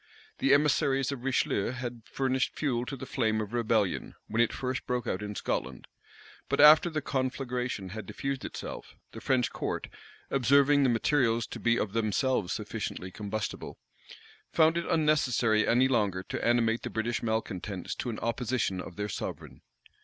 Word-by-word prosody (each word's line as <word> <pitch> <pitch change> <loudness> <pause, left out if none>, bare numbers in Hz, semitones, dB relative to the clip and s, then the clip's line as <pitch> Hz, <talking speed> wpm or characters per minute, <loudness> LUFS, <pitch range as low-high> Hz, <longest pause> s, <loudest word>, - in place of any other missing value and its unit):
The 135 - +3
emissaries 140 -2 +3
of 130 -3 -6
Richelieu 125 -4 0
had 120 -2 -5
furnished 130 -1 0
fuel 125 -5 -1
to 135 - -4
the - - -7
flame 110 -4 0
of 110 +1 -4
rebellion, 110 -4 0
when 115 +2 0
it 120 - +3
first 130 0 -3
broke 125 -1 -1
out 95 - -2
in 105 0 -5
Scotland; - - -3 0.6
but - - 0
after 155 +4 +8
the 155 -3 -3
conflagration 125 -6 -2
had 105 0 -7
diffused 135 -1 -4
itself, - - -7 0.2
the - - -9
French 125 -2 +1
court, - - -3 0.4
observing 140 +2 +4
the 135 - +4
materials 115 -1 +2
to - - -8
be 120 0 +2
of 100 - -2
themselves 115 -1 0
sufficiently 90 0 -4
combustible, 105 +2 -5 0.7
found 160 0 +4
it 170 - -2
unnecessary 125 -9 +2
any 125 +3 +4
longer 105 -7 +1
to - - -5
animate 115 -1 +2
the 120 - -5
British 115 +2 -2
malecontents 105 -5 -3
to 125 - -4
an 110 - -4
opposition 115 -5 -1
of 90 - -9
their 105 0 -3
sovereign. 100 - -6
120 Hz, 160 wpm, -29 LUFS, 110-135 Hz, 0.7 s, after